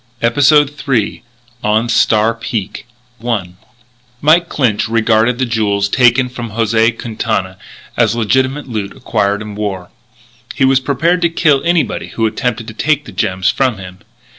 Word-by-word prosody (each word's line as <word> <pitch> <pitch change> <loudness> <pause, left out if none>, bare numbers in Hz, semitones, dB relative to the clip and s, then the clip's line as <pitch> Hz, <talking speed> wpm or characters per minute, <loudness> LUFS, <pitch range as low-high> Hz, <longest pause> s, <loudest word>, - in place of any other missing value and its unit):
EPISODE 145 +4 +4
THREE 120 -9 -1 0.4
ON 110 +2 +1
STAR 110 -1 +2
PEAK 115 -2 -5 0.4
I 110 -7 -2 0.7
Mike 165 +4 +3
Clinch 115 -7 0
regarded 115 +1 +2
the 130 - 0
jewels 105 -4 0
taken 125 +3 +3
from 120 -3 -7
José 115 0 +1
Quintana 110 -5 -3 0.4
as 115 -2 +2
legitimate 130 +5 0
loot 105 -5 -5
acquired 105 -1 -1
in 105 -1 -8
war. 100 -4 -5 0.6
He 135 - +2
was 135 0 +4
prepared 150 +7 0
to 170 - +3
kill 150 -4 +2
anybody 170 -1 0
who 115 - -2
attempted 115 +1 -2
to - - -9
take 150 +5 0
the - - -10
gems 95 0 0
from 130 -5 0
him. 95 -1 -10
115 Hz, 145 wpm, -15 LUFS, 105-130 Hz, 0.7 s, EPISODE